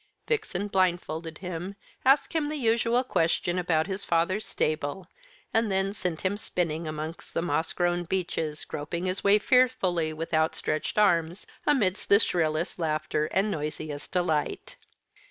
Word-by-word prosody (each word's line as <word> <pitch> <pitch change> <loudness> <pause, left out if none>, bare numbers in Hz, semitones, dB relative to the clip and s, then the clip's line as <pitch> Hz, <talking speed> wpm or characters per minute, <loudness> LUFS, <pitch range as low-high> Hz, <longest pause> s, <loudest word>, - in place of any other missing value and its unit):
Vixen 205 - -1
blindfolded 170 -4 0
him, 180 +1 -5 0.3
asked 275 +2 +4
him 310 -3 0
the 305 - -3
usual 235 -1 +2
question 175 -4 +1
about 165 -3 +1
his 195 0 -3
father's 170 +5 +1
stable, 155 +4 -1 0.5
and 225 -2 +2
then 195 +1 +1
sent 180 -5 -3
him 190 +2 0
spinning 165 -5 -2
amongst 155 +2 -6
the - - +2
moss 160 -1 0
grown 175 0 0
beeches, 165 -4 -2
groping 170 +4 -4
his 185 +1 -2
way 200 +1 +6
fearfully, 200 -9 +2
with 160 +2 -6
outstretched 155 +1 0
arms, 175 -3 +2 0.2
amidst 210 -12 +1
shrillest 165 -3 0
laughter 155 -1 0
and 195 +3 +1
noisiest 150 -2 -5
delight. 175 - -1
175 Hz, 135 wpm, -27 LUFS, 160-200 Hz, 0.5 s, way